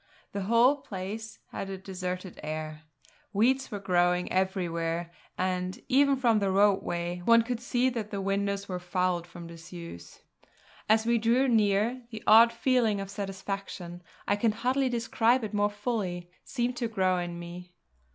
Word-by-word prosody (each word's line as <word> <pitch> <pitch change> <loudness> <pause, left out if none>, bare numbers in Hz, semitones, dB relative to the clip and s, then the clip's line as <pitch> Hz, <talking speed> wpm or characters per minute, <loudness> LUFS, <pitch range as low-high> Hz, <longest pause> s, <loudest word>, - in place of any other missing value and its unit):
The 200 - -3
whole 235 +6 +5
place 215 -1 -6
had 195 - -5
a 195 - -4
deserted 185 -1 -5
air; 155 0 -5 0.5
weeds 260 +6 +2
were 210 - -4
growing 180 -2 +1
everywhere, 170 -3 -1 0.3
and, 185 0 -1
even 280 +1 +4
from 235 -5 +3
the 200 -1 0
roadway, 180 -3 +1
one 230 +3 +6
could 240 0 -3
see 245 +1 +1
that 225 -4 -4
the 200 -2 -4
windows 200 0 -1
were 180 -1 -3
fouled 180 -1 -1
from 175 -1 -10
disuse. 170 - -10 0.7
As 220 +1 +4
we 235 0 +3
drew 235 +4 +3
near, 220 +1 +2
the 220 -2 -8
odd 230 +2 +8
feeling 235 -3 +2
of 195 0 -6
satisfaction 195 -3 -5 0.3
I 205 - +2
can 220 0 +2
hardly 255 +4 +1
describe 235 +1 +2
it 215 - -4
more 205 0 +2
fully 205 -5 -3
seemed 245 -1 -2
to 235 - -1
grow 185 -4 +1
in 175 -1 -4
me. 175 +1 -9
200 Hz, 155 wpm, -28 LUFS, 180-230 Hz, 0.7 s, odd